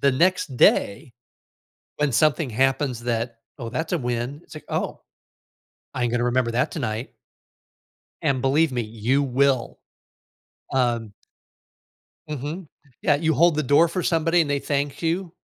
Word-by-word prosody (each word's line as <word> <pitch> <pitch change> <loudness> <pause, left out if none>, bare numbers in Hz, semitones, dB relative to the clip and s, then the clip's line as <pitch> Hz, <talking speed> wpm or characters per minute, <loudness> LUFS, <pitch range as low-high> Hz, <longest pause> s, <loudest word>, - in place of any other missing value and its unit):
the 140 - +4
next 165 -2 +1
day, 120 +3 +3 0.9
when 150 -2 +1
something 150 +4 +2
happens 130 0 0
that, 115 -1 -2 0.2
"Oh, 120 -4 -6
that's 160 +8 -3
a - - +2
win," 125 +2 -3
it's 155 - -15
like, 155 - -10
"Oh, - - -3 0.9
I 125 - -2
ain't 120 - -1
gonna 120 0 +1
remember 125 -1 +1
that 120 +2 0
tonight." 110 +4 -4 1.1
And 130 -2 +1
believe 140 +3 +2
me, 120 -1 -1
you 115 +5 0
will. 135 -1 +1 1.0
Um 120 -5 0 1.2
Mhm, 150 +4 -5 0.3
yeah, 150 - +3
you 160 +2 +1
hold 170 +4 +4
the 155 - +1
door 145 +5 +4
for 180 +2 -2
somebody 165 +1 +2
and 150 - -4
they 145 - +1
thank 140 +1 -2
you. 170 +1 -1
135 Hz, 145 wpm, -23 LUFS, 120-155 Hz, 1.2 s, the